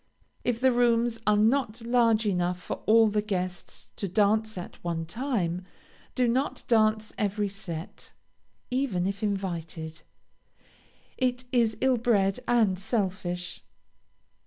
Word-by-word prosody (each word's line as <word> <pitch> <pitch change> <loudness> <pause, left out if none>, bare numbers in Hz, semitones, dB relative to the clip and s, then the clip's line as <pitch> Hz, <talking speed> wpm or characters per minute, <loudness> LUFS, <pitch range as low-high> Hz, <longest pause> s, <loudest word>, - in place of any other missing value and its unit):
If 240 -2 0
the 260 +1 +4
rooms 235 -1 +2
are 210 0 +5
not 230 +1 +2
large 230 -2 +3
enough 180 -2 0
for - - -6
all 225 0 +6
the 210 0 +1
guests 185 -4 -4
to 200 - -2
dance 215 +3 +1
at 180 - -8
one 165 -1 -2
time, 185 - -2 0.5
do 250 -2 +3
not 260 +4 0
dance 215 -2 +2
every 205 0 0
set, 180 -5 -7 0.6
even 250 -9 0
if 195 +1 -3
invited. 170 -6 -3 1.2
It 250 0 0
is 230 -4 +2
ill 260 -1 +3
bred 210 -4 +2
and 215 -6 +3
selfish. 185 -4 -3
215 Hz, 125 wpm, -27 LUFS, 185-235 Hz, 1.2 s, all